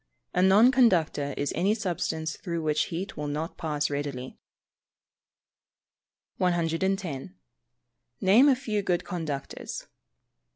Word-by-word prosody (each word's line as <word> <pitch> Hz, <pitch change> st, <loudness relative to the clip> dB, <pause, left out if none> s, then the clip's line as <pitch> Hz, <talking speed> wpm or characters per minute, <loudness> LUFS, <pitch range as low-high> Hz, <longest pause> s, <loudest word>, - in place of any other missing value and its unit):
_ -, -, -47 dB, 0.3 s
A 180 Hz, -, +2 dB
non 200 Hz, +7 st, +6 dB
conductor 170 Hz, -, +2 dB
is 145 Hz, -, -1 dB
any 195 Hz, +6 st, +2 dB
substance 165 Hz, -5 st, -2 dB
through 170 Hz, -3 st, -4 dB
which 155 Hz, -1 st, +1 dB
heat 180 Hz, +4 st, -5 dB
will 150 Hz, -1 st, -4 dB
not 155 Hz, +4 st, -3 dB
pass 150 Hz, -2 st, -1 dB
readily. 140 Hz, -3 st, -5 dB, 2.0 s
110. 170 Hz, -, -1 dB, 0.8 s
_Name 230 Hz, +10 st, +6 dB
a -, -, +4 dB
few 220 Hz, -5 st, -2 dB
good 180 Hz, -2 st, -1 dB
conductors. 160 Hz, -6 st, -5 dB
170 Hz, 115 wpm, -27 LUFS, 150-195 Hz, 2.0 s, non